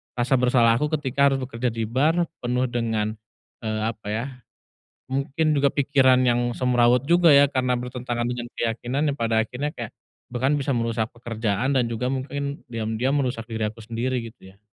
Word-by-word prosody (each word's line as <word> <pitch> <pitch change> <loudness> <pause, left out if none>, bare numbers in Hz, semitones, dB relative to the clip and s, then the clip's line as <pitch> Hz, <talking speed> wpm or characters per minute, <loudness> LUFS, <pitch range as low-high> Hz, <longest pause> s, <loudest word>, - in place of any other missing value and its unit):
rasa 125 +2 +1
bersalah 120 -2 +4
aku 150 - +1
ketika 140 -1 +2
harus 135 - 0
bekerja 125 0 -3
di 115 0 -3
bar, 155 +9 +2 0.2
penuh 125 +1 0
dengan, 110 -2 -1 0.5
eee, 110 -1 -2
apa 110 -2 -14
ya, 110 +3 -2 0.9
mungkin 140 +3 0
juga 140 -1 +3
pikiran 130 -2 +3
yang 120 0 +2
semrawut 125 +1 +3
juga 170 -1 +5
ya 140 0 +7
karena 125 -2 +1
bertentangan 125 -1 -3
dengan 120 0 -4
keyakinan, 120 +6 -1
yang - - -2
pada 115 -1 +2
akhirnya 145 +6 -3
kayak 115 -3 -7 0.4
bahkan 130 +4 +1
bisa 140 0 -2
merusak 115 -1 0
pekerjaan 115 +2 -1
dan 120 - +2
juga 115 +2 -2
mungkin 140 +2 -4
diam-diam 115 +4 -1
merusak 120 -3 -3
diri 110 -1 -1
aku 110 - -18
sendiri, 120 +3 -2
gitu 95 -5 -16
ya? 100 - -29
125 Hz, 170 wpm, -24 LUFS, 115-135 Hz, 0.9 s, ya